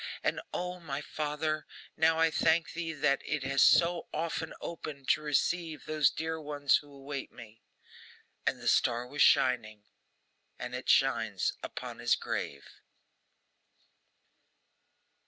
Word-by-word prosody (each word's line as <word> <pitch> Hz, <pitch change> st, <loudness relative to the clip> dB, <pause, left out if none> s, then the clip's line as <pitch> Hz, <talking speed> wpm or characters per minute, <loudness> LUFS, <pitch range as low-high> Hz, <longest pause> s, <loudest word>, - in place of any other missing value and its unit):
And -, -, 0 dB
O, 180 Hz, 0 st, -4 dB
my 145 Hz, -5 st, -4 dB
Father, 150 Hz, +1 st, -3 dB, 0.3 s
now 160 Hz, +1 st, +3 dB
I 165 Hz, 0 st, +3 dB
thank 160 Hz, +1 st, +2 dB
thee 165 Hz, 0 st, -3 dB
that 145 Hz, -3 st, +1 dB
it 150 Hz, -2 st, -2 dB
has 135 Hz, 0 st, +1 dB
so 170 Hz, 0 st, +5 dB
often 160 Hz, 0 st, -3 dB
opened, 150 Hz, -5 st, -7 dB
to -, -, +4 dB
receive 155 Hz, +2 st, -1 dB
those 155 Hz, -3 st, +3 dB
dear 160 Hz, 0 st, -4 dB
ones 145 Hz, -2 st, +2 dB
who 145 Hz, -1 st, -12 dB
await 140 Hz, 0 st, -6 dB
me!' 115 Hz, -1 st, -13 dB, 0.9 s
And -, -, +1 dB
the -, -, -6 dB
star 120 Hz, 0 st, +3 dB
was 145 Hz, +4 st, -3 dB
shining; 110 Hz, -5 st, +3 dB, 0.7 s
and 125 Hz, 0 st, -6 dB
it 125 Hz, +1 st, -5 dB
shines 110 Hz, -8 st, +2 dB
upon -, -, -7 dB
his -, -, +3 dB
grave. 70 Hz, -1 st, -4 dB
150 Hz, 130 wpm, -31 LUFS, 135-160 Hz, 0.9 s, so